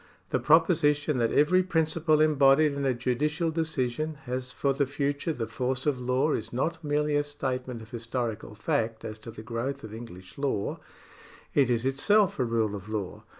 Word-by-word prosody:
The - - +1
proposition 150 -3 +3
that 115 -1 +2
every 180 +6 +4
principle 160 -3 +1
embodied 150 0 +5
in 140 0 -2
a 130 - +2
judicial 150 +7 0
decision 155 -2 -1
has 125 0 -4
for 140 +2 0
the 140 0 0
future 145 +3 -1
the 120 -7 -3
force 130 +2 -2
of 145 -4 +1
law 130 +4 +1
is 110 +1 -3
not 160 +7 -2
merely 150 0 +1
a 145 - +4
statement 130 -4 -4
of 110 - -15
historical 115 -2 -4
fact 110 +1 -1
as 110 -1 -6
to 110 - -10
the 110 -1 -9
growth 125 +4 -4
of 110 -1 -8
English 110 -3 -10
law; 135 -8 -1 0.7
it 140 -3 +3
is 120 0 +1
itself 185 +9 +3
a - - +3
rule 115 -3 0
of 100 0 -7
law. 105 -4 -4
135 Hz, 180 wpm, -28 LUFS, 115-150 Hz, 0.7 s, embodied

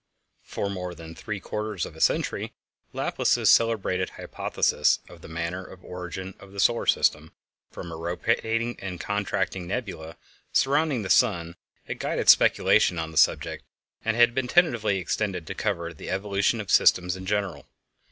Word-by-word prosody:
For 100 - -4
more 90 -3 -5
than 80 -1 -10
three 100 +5 -5
quarters 105 -1 -3
of - - -10
a - - -10
century - - 0 0.4
Laplace's - - +2
celebrated 100 -5 +2
hypothesis - - 0
of - - -14
the - - -11
manner 85 +3 -4
of 95 0 -14
origin 90 +1 -6
of 100 0 -14
the 100 - -7
solar 115 +4 +2
system - - +2 0.4
from 85 - -8
a - - -6
rotating 115 +7 -1
and 90 -3 -6
contracting 100 -2 -2
nebula 95 -7 -5 0.3
surrounding 140 -3 +2
the 95 - -2
sun 85 -8 +2 0.3
had - - -6
guided - - 0
speculation 90 - +5
on 80 0 -3
that 80 - -8
subject, 80 +1 +2 0.4
and 115 0 0
had 120 0 +5
been 130 0 -1
tentatively 120 - +3
extended 90 -1 -2
to 95 - -5
cover 85 -5 -2
the 75 - -9
evolution 100 +3 0
of 105 - -4
systems 90 0 +4
in 95 0 -8
general. 100 -8 -2
95 Hz, 160 wpm, -26 LUFS, 85-110 Hz, 0.4 s, speculation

